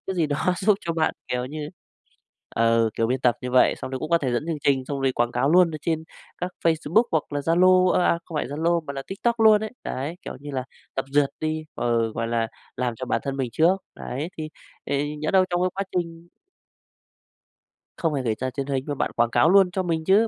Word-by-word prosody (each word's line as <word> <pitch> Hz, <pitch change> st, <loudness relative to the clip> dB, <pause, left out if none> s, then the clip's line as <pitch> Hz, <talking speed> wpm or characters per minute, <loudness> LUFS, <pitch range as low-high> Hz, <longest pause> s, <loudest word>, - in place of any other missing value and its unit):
gì 170 Hz, -3 st, +2 dB
đó 145 Hz, -1 st, -1 dB, 0.2 s
giúp 205 Hz, +2 st, +3 dB
cho 170 Hz, -, -2 dB
bạn, 160 Hz, -1 st, +1 dB
kiểu 125 Hz, 0 st, -1 dB
như 150 Hz, +2 st, -6 dB, 0.9 s
ừ, 115 Hz, 0 st, +3 dB
kiểu, 115 Hz, -, +1 dB
biên 125 Hz, +2 st, -1 dB
tập 120 Hz, -3 st, +3 dB
như 125 Hz, -, -4 dB
vậy, 125 Hz, 0 st, +5 dB
xong -, -, -7 dB
rồi 130 Hz, -, -3 dB
cũng 155 Hz, -, -5 dB
có 170 Hz, -, +5 dB
thể 130 Hz, -6 st, -1 dB
dẫn 120 Hz, +5 st, -1 dB
chương 165 Hz, -2 st, -1 dB
trình 135 Hz, -2 st, +2 dB
xong 140 Hz, +1 st, -4 dB
rồi 135 Hz, -1 st, +2 dB
quảng 120 Hz, -1 st, 0 dB
cáo 130 Hz, +4 st, +1 dB
luôn 175 Hz, 0 st, +5 dB
ở 155 Hz, -, -5 dB
trên 160 Hz, -1 st, -1 dB, 0.3 s
các 180 Hz, +1 st, -3 dB
Facebook 165 Hz, +5 st, +3 dB
hoặc 160 Hz, -2 st, +2 dB
là 145 Hz, -, -1 dB
Zalo 185 Hz, +4 st, +4 dB
ơ, 180 Hz, -, +3 dB
à, 170 Hz, -, +3 dB
không 165 Hz, -, -7 dB
phải 150 Hz, -, 0 dB
Zalo 165 Hz, +5 st, 0 dB
mà 140 Hz, -, -4 dB
là 135 Hz, -1 st, -5 dB
TikTok 235 Hz, +4 st, -1 dB
luôn 215 Hz, -1 st, +7 dB
ấy. 215 Hz, -, -5 dB
Đấy, 140 Hz, +6 st, -3 dB
kiểu -, -, -7 dB
như 145 Hz, +1 st, -7 dB
là 130 Hz, -2 st, -3 dB, 0.3 s
tập 135 Hz, -, 0 dB
duyệt 145 Hz, 0 st, +3 dB
đi, 155 Hz, 0 st, -2 dB
ờ, 115 Hz, -2 st, 0 dB
gọi 115 Hz, +1 st, -2 dB
là, 115 Hz, -1 st, 0 dB, 0.3 s
làm 125 Hz, -1 st, -1 dB
cho 130 Hz, -, -5 dB
bản -, -, 0 dB
thân 135 Hz, -1 st, -3 dB
mình 130 Hz, -3 st, -2 dB
trước. 170 Hz, +8 st, +4 dB, 0.2 s
Đấy, 140 Hz, +6 st, -4 dB
thì 155 Hz, -, -4 dB, 0.4 s
thì 145 Hz, +2 st, -1 dB
nhỡ 155 Hz, +1 st, -2 dB
đâu 190 Hz, -1 st, +5 dB
trong 175 Hz, 0 st, 0 dB
cái 185 Hz, -, +2 dB
quá 195 Hz, -, -2 dB
trình 165 Hz, 0 st, -6 dB, 1.7 s
Không 165 Hz, -3 st, 0 dB
phải 135 Hz, -, -1 dB
gửi 115 Hz, -3 st, 0 dB
ra 130 Hz, -, -1 dB
truyền 135 Hz, +1 st, -4 dB
hình 135 Hz, -2 st, -1 dB
mà 145 Hz, -, -2 dB
bạn -, -, -1 dB
quảng 120 Hz, 0 st, +3 dB
cáo 120 Hz, +7 st, +4 dB
luôn 190 Hz, -1 st, +5 dB
cho 185 Hz, +1 st, -1 dB
mình 165 Hz, -2 st, -1 dB
chứ. 205 Hz, +5 st, +5 dB
150 Hz, 245 wpm, -24 LUFS, 130-170 Hz, 1.7 s, luôn